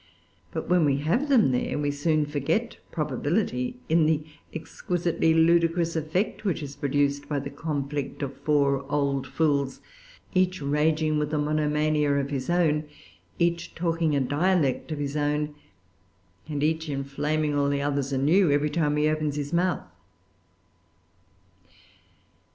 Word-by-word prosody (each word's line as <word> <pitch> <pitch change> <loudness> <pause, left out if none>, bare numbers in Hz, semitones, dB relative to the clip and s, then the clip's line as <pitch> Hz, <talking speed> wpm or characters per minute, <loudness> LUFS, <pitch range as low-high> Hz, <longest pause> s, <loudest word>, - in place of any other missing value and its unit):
But - - -5
when 180 -1 +4
we 140 -2 +3
have 235 - 0
them 235 - +5
there, 125 - -1
we 145 -1 0
soon 150 +1 +1
forget 150 - -1
probability 145 - -1
in 160 -1 +3
the 155 -1 +1 0.3
exquisitely 170 0 -1
ludicrous 165 0 +3
effect 160 +8 -1
which 180 -6 -1
is 140 -1 -7
produced 140 0 0
by 145 - 0
the 140 0 -4
conflict 145 -1 -3
of 135 -1 -4
four 140 -2 +2
old 140 -2 0
fools, 140 -4 0 0.5
each 185 -1 +2
raging 155 +2 +1
with 150 0 -1
a - - +1
monomania 150 0 +1
of 140 0 -1
his 135 0 -3
own, 160 -3 +2 0.5
each 170 0 0
talking 165 -2 0
a - - +3
dialect 145 +2 +1
of 155 - -2
his 145 0 -3
own, 150 0 0 1.0
and 145 -1 -2
each 160 +1 0
inflaming 145 +2 -1
all 140 -1 +2
the 140 0 0
others 140 -1 -1
anew 155 +7 +3
every 145 +1 +2
time 150 -2 +1
he 150 0 +3
opens 155 -1 0
his 145 +1 -4
mouth. 180 +1 +1
150 Hz, 140 wpm, -26 LUFS, 140-165 Hz, 1.0 s, them